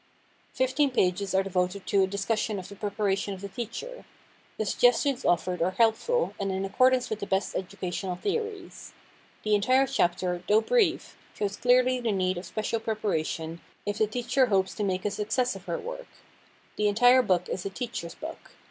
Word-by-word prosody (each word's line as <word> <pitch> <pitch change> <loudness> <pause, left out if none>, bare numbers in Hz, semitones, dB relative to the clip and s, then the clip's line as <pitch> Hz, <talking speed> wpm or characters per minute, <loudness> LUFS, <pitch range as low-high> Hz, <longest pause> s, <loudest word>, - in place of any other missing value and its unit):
Fifteen 260 +3 +2
pages 190 -4 0
are 190 - +4
devoted 185 0 -1
to 200 - +3
a 190 - +3
discussion 205 +2 -1
of 185 - -7
the 200 - -10
preparation 200 -1 -1
of 185 - -12
the 200 - -5
teacher. 245 - -6 0.5
The 215 - -1
suggestions 245 +5 +2
offered 175 +1 +1
are 185 +2 +1
helpful, 240 - +2
and 195 -1 -1
in 190 +1 -2
accordance 255 +5 +3
with 215 - -2
the 200 - -5
best 190 +1 0
educational 185 -1 -3
theories. 425 - -4 0.5
The 215 - +1
entire 255 +6 +4
chapter, 180 -8 0
though 215 +1 +5
brief, 380 - +1 0.2
shows 200 -1 -2
clearly 250 +2 +3
the 235 -2 0
need 185 -2 0
of 180 - -9
special 220 +1 -2
preparation, 170 -7 -2 0.2
if 205 +1 -2
a 215 - +4
teacher 245 +3 +1
hopes 190 -3 +1
to 210 - -3
make 185 -2 -1
a 210 - +1
success 225 +5 0
of - - -11
her - - -2
work. - - -7 0.7
The 210 - +2
entire 245 +5 +6
book 180 -6 +1
is 180 - -4
a - - -3
teacher's 195 -5 -5
book. - - -9
210 Hz, 180 wpm, -27 LUFS, 190-250 Hz, 0.7 s, entire